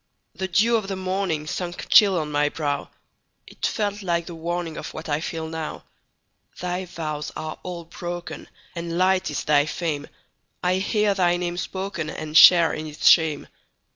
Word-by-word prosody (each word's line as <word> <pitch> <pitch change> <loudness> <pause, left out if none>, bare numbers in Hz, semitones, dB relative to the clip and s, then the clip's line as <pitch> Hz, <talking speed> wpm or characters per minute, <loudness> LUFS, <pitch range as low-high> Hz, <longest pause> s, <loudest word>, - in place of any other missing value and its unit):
The 190 - -3
dew 220 +6 +3
of 210 -3 -4
the 195 - -3
morningSunk 180 -2 -3
chill 200 -3 +6
on 155 -2 -2
my 145 0 +2
brow; 145 -2 -3 0.6
It - - -3
felt 205 -1 -2
like 170 -3 -1
the 170 - -8
warningOf 170 0 -4
what 160 - -7
I 145 -1 0
feel 160 -1 -4
now. 160 -1 -5 0.8
Thy 180 +1 -3
vows 155 -4 -5
are 155 0 -6
all 175 -2 -6
broken, 175 0 -7 0.3
And 170 0 -4
light 185 0 +2
is 150 - -3
thy 145 0 +3
fame:I 170 +3 -4
hear 205 +1 +1
thy 175 -2 +2
name 175 0 -3
spokenAnd 170 -5 -5
share 170 +1 +8
in 155 0 -5
its 150 -1 -1
shame. 160 -4 +5
170 Hz, 155 wpm, -24 LUFS, 155-185 Hz, 0.8 s, share